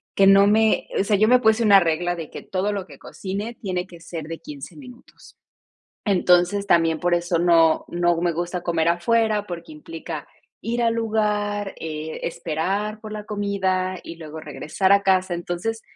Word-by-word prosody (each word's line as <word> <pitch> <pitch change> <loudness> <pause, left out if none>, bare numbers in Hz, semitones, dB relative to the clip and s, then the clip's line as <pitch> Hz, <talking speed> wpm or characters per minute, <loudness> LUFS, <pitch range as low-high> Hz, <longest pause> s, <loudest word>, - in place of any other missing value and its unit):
que 195 0 +5
no 195 0 +7
me 220 +1 +3
o - - +3
sea, 205 0 +2
yo 215 +2 +4
me 250 +1 +6
puse 220 0 +3
una 200 -2 +7
regla 175 +1 0
de 165 -3 -7
que - - -8
todo 195 +2 -2
lo 195 -3 -4
que - - -14
cocine 205 +4 -6
tiene 185 -2 -3
que 170 -2 -13
ser 165 -1 -7
de 165 +1 -7
15 145 -2 -10
minutos. 250 -3 -15 0.7
Entonces, 180 +1 +3
también 165 -3 +3
por 175 0 +2
eso 175 0 0
no 165 -2 +4
no 175 -1 +1
me 175 -1 +1
gusta 175 +2 -3
comer 170 -1 0
afuera, 210 +4 +1
porque 175 - -8
implica 325 +2 -8 0.4
ir 235 +1 -1
al 230 -1 +2
lugar, 210 -2 -1
eh, 155 0 -5
esperar 185 +6 -2
por 215 -1 -8
la 210 -1 -6
comida, 190 -3 -1
y 165 - -9
luego 160 -1 -9
regresar 170 +6 0
a 200 0 +5
casa. 185 -2 +2
Entonces, 175 +6 -4
190 Hz, 180 wpm, -23 LUFS, 170-210 Hz, 0.7 s, no